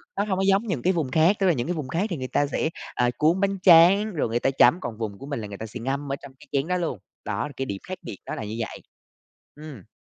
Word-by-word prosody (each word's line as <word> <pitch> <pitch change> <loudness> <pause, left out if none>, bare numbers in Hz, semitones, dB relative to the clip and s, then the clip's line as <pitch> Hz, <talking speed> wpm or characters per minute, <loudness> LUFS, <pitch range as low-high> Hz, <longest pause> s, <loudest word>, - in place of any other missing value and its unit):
nó 200 - +1
hông 195 -3 -1
có - - +1
giống 195 +4 +3
những 160 -11 -2
cái 185 - +2
vùng 150 -7 -2
khác, 160 +7 +4
tức 195 - +2
là 175 - +5
những 125 0 -2
cái 175 - 0
vùng 150 -5 -4
khác 170 +9 -1
thì 170 - -3
người 130 -1 -4
ta 145 - +1
sẽ, 155 - -1 0.3
à, 125 0 +2
cuốn 165 +5 +3
bánh 195 -1 +1
tráng 190 +5 +7
rồi 150 -8 -1
người 120 +1 0
ta 135 - +1
chấm, 165 +6 +5
còn 110 - -5
vùng 105 -3 -4
của 135 - -10
mình 140 -4 -4
là 105 - -6
người 100 -1 -8
ta 110 - -6
sẽ 115 +3 -8
ngâm 135 +3 -3
ở - - 0
trong 140 -1 -12
cái - - -16
chén 140 +2 0
đó 180 0 0
luôn, 165 - -3 0.3
đó 105 +6 -2
là 145 - -11
cái 135 - -2
điểm 100 -5 -4
khác 185 - -5
biệt 95 - -8
đó - - -4
là - - -5
như 105 +1 -5
vậy. 115 - -4 0.8
Ừm. 145 -9 -11
145 Hz, 310 wpm, -25 LUFS, 120-180 Hz, 0.8 s, tráng